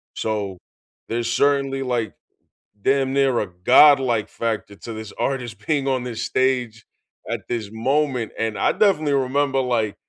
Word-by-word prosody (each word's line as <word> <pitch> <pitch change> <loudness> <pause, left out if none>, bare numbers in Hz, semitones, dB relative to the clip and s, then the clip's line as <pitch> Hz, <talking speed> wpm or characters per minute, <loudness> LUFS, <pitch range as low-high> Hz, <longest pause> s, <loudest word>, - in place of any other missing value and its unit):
So, 105 -4 -3 0.5
there's 115 0 -2
certainly, 135 +1 +1
like, 120 -5 -2 0.7
damn 135 +2 +1
near 135 -3 +2
a 105 - -2
godlike 120 +5 +4
factor 110 -3 -3
to 115 +3 -8
this 110 -1 -8
artist 125 -5 -3
being 145 -3 0
on 130 -2 0
this 120 -3 -5
stage 125 -4 0 0.4
at - - -2
this 115 -4 -3
moment. 130 0 0
And 110 -1 -2
I - - +2
definitely 155 -9 +2
remember, 135 0 +1
like, 115 -5 -1
125 Hz, 145 wpm, -22 LUFS, 110-135 Hz, 0.7 s, godlike